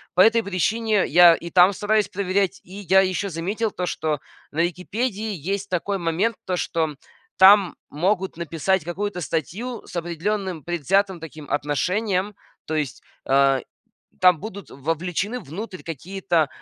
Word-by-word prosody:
по - - -1
этой 225 +1 +5
причине 210 +2 +1
я 175 +1 +8
и 170 +1 -5
там 180 +2 +6
стараюсь 210 0 +1
проверять. 195 -1 0
И 185 - -15
я 190 -1 +3
ещё 190 +1 -1
заметил 200 +6 -2
то, 180 - -3
что 155 -3 -2 0.3
на 155 - -4
"Википедии" 210 +5 -3
есть 195 +4 -3
такой 190 +3 -1
момент, 180 +6 0
то, 180 -1 -1
что 160 -3 -1 0.4
там 195 0 +7
могут 185 +3 -1
написать 170 +2 0
какую-то 180 +2 -3
статью 185 - -3
с - - -11
определённым 175 +1 -2
предвзятым 180 +3 0
таким 155 -2 -10
отношением. 185 +7 0 0.3
То 160 - -3
есть, 150 -4 -2 0.2
а, 135 0 +3 0.6
там 180 -4 +5
будут 200 -2 -8
вовлечены 170 - -2
внутрь 185 +4 -7
какие-то, 170 0 -1
185 Hz, 140 wpm, -23 LUFS, 165-200 Hz, 0.6 s, я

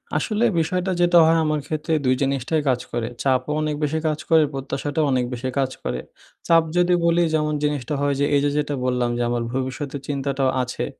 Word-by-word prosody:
আসলে 215 0 0 0.2
বিষয়টা 180 +3 -1
যেটা 175 0 +5
হয় 165 +1 +4
আমার 155 -1 0
ক্ষেত্রে 155 +1 -2
২ 130 0 +3
জিনিসটাই 140 +3 0
কাজ 125 -1 +1
করে। 120 -1 -2 0.2
চাপও 130 +1 +1
অনেক 155 -1 -1
বেশি 155 +2 0
কাজ 155 -1 -1
করে, 160 -1 +6
প্রত্যাশাটাও 140 +3 -2
অনেক 125 -1 +1
বেশি 125 +1 -3
কাজ 135 -1 +1
করে। 60 - -2 0.5
চাপ 165 -1 +5
যদি 175 0 +3
বলি 170 +1 +3
যেমন 150 -1 +1
জিনিসটা 145 -2 -1
হয় 145 0 +1
যে 145 - +3
এই - - +4
যে 145 - +2
যেটা 150 -1 -1
বললাম 125 -1 0
যে - - -1
আমার 120 -1 -1
ভবিষ্যতের 135 +2 -4
চিন্তাটাও 140 -1 0
আছে। 125 - -4
145 Hz, 195 wpm, -22 LUFS, 130-155 Hz, 0.5 s, করে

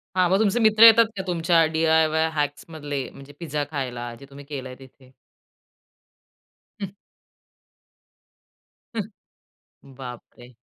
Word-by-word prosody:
हां, 185 -1 +3
मग 190 +3 +3
तुमचे 220 +2 +2
मित्र 220 0 +5
येतात 230 0 +9
का 190 - -3
तुमच्या 170 -1 +2
डी-आय-वाय 160 0 +2
हॅक्समधले 145 -2 -4
म्हणजे 140 +1 -13
पिझ्झा 150 -3 -3
खायला, 120 -4 -4
जे 140 - -12
तुम्ही 140 0 -12
केलंय 130 -3 -7
तिथे? 130 -1 -18 1.7
हं. 195 - -3 2.7
हं. 135 - -21
बापरे! 125 -1 -11
150 Hz, 105 wpm, -24 LUFS, 135-170 Hz, 2.7 s, येतात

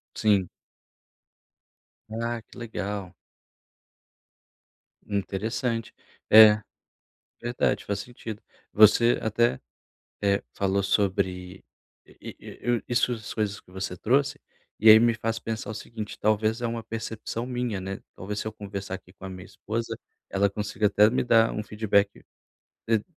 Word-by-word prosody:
Sim. 100 -4 +2 1.6
Ah, 115 +1 -3
que - - -17
legal. 100 -4 -5 1.9
Interessante. 110 +4 -2 0.4
É, 110 -1 +9 0.8
verdade. 120 +1 0
Faz 100 -1 -2
sentido. 110 -1 -8 0.3
Você 110 +3 +6
até, 110 - +1 0.6
eh, 100 -1 +2
falou 100 0 +1
sobre 95 -2 -1 0.4
E - - -11
e - - -11
eu 120 0 0
isso 120 0 +2
as 110 -3 -6
coisas 105 -2 -2
que - - -23
você 95 -1 -5
trouxe. 135 +9 +1 0.4
E 110 - +7
aí 110 - +11
me 115 0 +3
faz 115 0 -2
pensar 110 -2 -5
o - - -5
seguinte: 110 0 -7
talvez, 110 +2 +1
é 120 - -1
uma 115 0 -3
percepção 115 +1 -5
minha, 125 -5 -2
né. 95 +1 -5
Talvez, 100 +3 -5
se - - -6
eu - - -8
conversar 100 -2 -6
aqui 95 -1 -10
com 100 - -14
a - - -4
minha 90 0 -9
esposa, 115 +1 -4 0.3
ela 100 0 +1
consiga 105 +1 -1
até 105 +1 +5
me 125 - +1
dar 115 -2 +4
um 105 - -3
feedback 105 -1 0 0.6
t 110 -2 +2
110 Hz, 135 wpm, -26 LUFS, 100-115 Hz, 1.9 s, aí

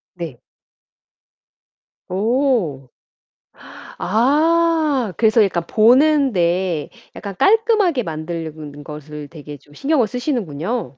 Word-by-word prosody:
네. 165 -9 -7 1.7
오. 205 - 0 1.1
아. 295 - +2
그래서 220 -1 +4
약간 175 -4 -1
보는데 215 - +2 0.3
약간 200 -2 -7
깔끔하게 420 - +3
만드는 155 -3 -6
것을 150 0 -9
되게 150 -2 -10
좀 145 +1 -22
신경을 275 - +1
쓰시는군요. 230 - -3
205 Hz, 180 characters per minute, -19 LUFS, -, 1.7 s, 그래서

